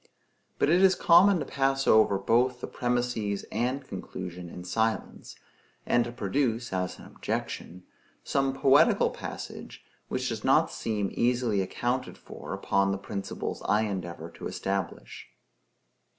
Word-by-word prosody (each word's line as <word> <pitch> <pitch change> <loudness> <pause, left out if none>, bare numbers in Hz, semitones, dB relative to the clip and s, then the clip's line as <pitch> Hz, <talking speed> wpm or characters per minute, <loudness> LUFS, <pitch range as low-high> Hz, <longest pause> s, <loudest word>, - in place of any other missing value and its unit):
But 150 - +2
it 175 +2 +5
is 190 -1 +6
common 185 +3 +6
to 150 - -3
pass 135 0 0
over 110 -2 +5
both 120 +5 +2
the - - -4
premises 120 -5 -1
and 130 +4 -1
conclusion 90 -2 -7
in 90 - -9
silence, 110 +5 -2 0.5
and 120 -1 +3
to 120 - -5
produce, 120 0 -1
as 90 -1 -2
an - - -13
objection, 90 +2 -5 0.4
some 135 -1 0
poetical 140 +3 +4
passage - - -8 0.2
which - - -2
does - - -4
not - - +4
seem 105 -3 -2
easily 120 -4 +1
accounted 120 +6 -2
for - - -10
upon 100 0 +1
the 100 - -1
principles 100 0 -5
I 105 +1 +4
endeavor 90 -5 -5
to - - -7
establish. 95 0 -4
115 Hz, 135 wpm, -28 LUFS, 100-130 Hz, 0.5 s, is